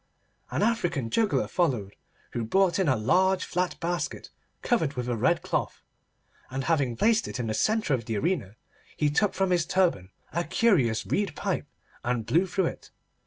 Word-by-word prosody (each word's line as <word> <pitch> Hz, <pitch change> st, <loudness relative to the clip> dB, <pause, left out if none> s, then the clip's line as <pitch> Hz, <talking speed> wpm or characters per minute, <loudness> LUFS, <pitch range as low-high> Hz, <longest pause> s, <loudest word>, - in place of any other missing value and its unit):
An -, -, 0 dB
African 175 Hz, -, 0 dB
juggler 220 Hz, -3 st, +1 dB
followed, 125 Hz, -, -1 dB, 0.4 s
who 120 Hz, -, -2 dB
brought 190 Hz, -, +2 dB
in 190 Hz, -, +2 dB
a 130 Hz, -, +4 dB
large 185 Hz, -, +2 dB
flat 180 Hz, 0 st, -2 dB
basket 175 Hz, +1 st, -3 dB, 0.3 s
covered 165 Hz, -, +1 dB
with 125 Hz, -1 st, -3 dB
a 120 Hz, -, 0 dB
red 110 Hz, -, +1 dB
cloth, -, -, -2 dB, 0.7 s
and 135 Hz, +1 st, -3 dB
having 140 Hz, -7 st, +1 dB
placed 220 Hz, -, +2 dB
it -, -, -5 dB
in 120 Hz, -, -1 dB
the 110 Hz, -, -2 dB
centre 215 Hz, -, +1 dB
of 120 Hz, -4 st, -1 dB
the 110 Hz, -2 st, -2 dB
arena, 110 Hz, -, -1 dB, 0.4 s
he 150 Hz, -1 st, +2 dB
took 205 Hz, +7 st, +1 dB
from 190 Hz, 0 st, +1 dB
his 175 Hz, -2 st, +3 dB
turban 175 Hz, -, +1 dB, 0.2 s
a 170 Hz, +2 st, 0 dB
curious 155 Hz, -, +2 dB
reed 195 Hz, -7 st, -1 dB
pipe, -, -, -2 dB, 0.4 s
and 120 Hz, -2 st, -1 dB
blew 165 Hz, +12 st, +2 dB
through 185 Hz, +1 st, 0 dB
it. -, -, -5 dB
165 Hz, 175 wpm, -27 LUFS, 120-190 Hz, 0.7 s, a